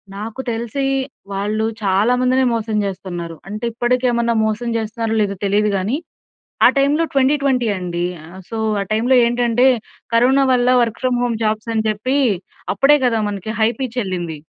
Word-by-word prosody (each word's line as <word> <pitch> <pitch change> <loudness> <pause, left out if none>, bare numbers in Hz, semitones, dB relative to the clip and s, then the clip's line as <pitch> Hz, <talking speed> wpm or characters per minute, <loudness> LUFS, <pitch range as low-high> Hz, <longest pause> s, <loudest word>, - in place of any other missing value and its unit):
నాకు 220 +5 -5
తెలిసి, 235 +4 -2 0.5
వాళ్ళు 210 +3 -1 0.2
చాలా 200 +5 +3
మందినే 255 +1 +3
మోసం 220 -1 -1
చేస్తన్నారు. 180 -3 -5
అంటే 215 +4 -5
ఇప్పటికేమైనా 240 0 +1
మోసం 220 +2 -2
చేస్తున్నారో 225 0 -3
లేదో 200 -1 -1
తెలియదు 205 +2 +2
గాని. 205 +9 -1 0.7
ఆ - - +10
టైమ్‌లో 285 +4 +3
2020 270 -2 +2
అండి. 175 -1 -3 0.4
సో 225 - -5 0.2
ఆ - - 0
టైమ్‌‌లో 235 +4 +3
ఏంటంటే 240 +1 +2 0.5
కరోనా 260 +4 +4
వల్ల 250 -1 +3
వర్క్ 230 -1 -1
ఫ్రమ్ 250 -1 +1
హోమ్ 235 -2 -1
జాబ్స్ 215 +1 -1
అని 220 0 0
చెప్పి 220 +6 -1 0.6
అప్పుడే 295 +2 +5
కదా 230 -2 +2
మనకి 205 +1 -5
హై 220 - +5
పిచ్ 255 -2 -4
ఎల్లింది. 175 -5 -4
230 Hz, 150 wpm, -19 LUFS, 210-250 Hz, 0.7 s, ఆ